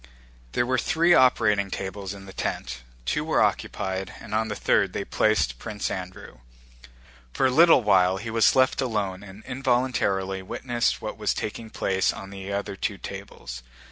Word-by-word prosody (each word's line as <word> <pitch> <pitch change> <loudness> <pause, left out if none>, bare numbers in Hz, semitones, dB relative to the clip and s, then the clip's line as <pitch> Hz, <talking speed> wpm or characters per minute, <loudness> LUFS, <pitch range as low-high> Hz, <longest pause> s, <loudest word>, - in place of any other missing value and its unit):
There 120 - +2
were 130 0 +1
three 170 +7 +3
operating 105 - +4
tables 95 +1 -5
in 100 0 -11
the 95 - -11
tent. 65 +1 -4 0.2
Two - - 0
were - - +1
occupied, 95 -1 -2
and 105 - -9
on 110 +1 +1
the 105 - -4
third - - +2
they - - -3
placed 75 - +1
Prince 105 -1 -4
Andrew. 90 -9 -7 0.9
For - - +1
a 130 - +4
little 160 -2 +6
while 95 -2 +4
he 110 +3 -5
was 115 -2 +4
left 130 +1 +3
alone 105 -7 -2
and 100 +1 -12
involuntarily 120 -7 0
witnessed 120 +5 -1
what - - -5
was - - 0
taking 110 +1 -5
place 95 -3 0
on 95 0 -9
the 100 0 -7
other 100 0 -3
two 100 +1 -3
tables. 95 -13 -8
100 Hz, 170 wpm, -25 LUFS, 95-120 Hz, 0.9 s, little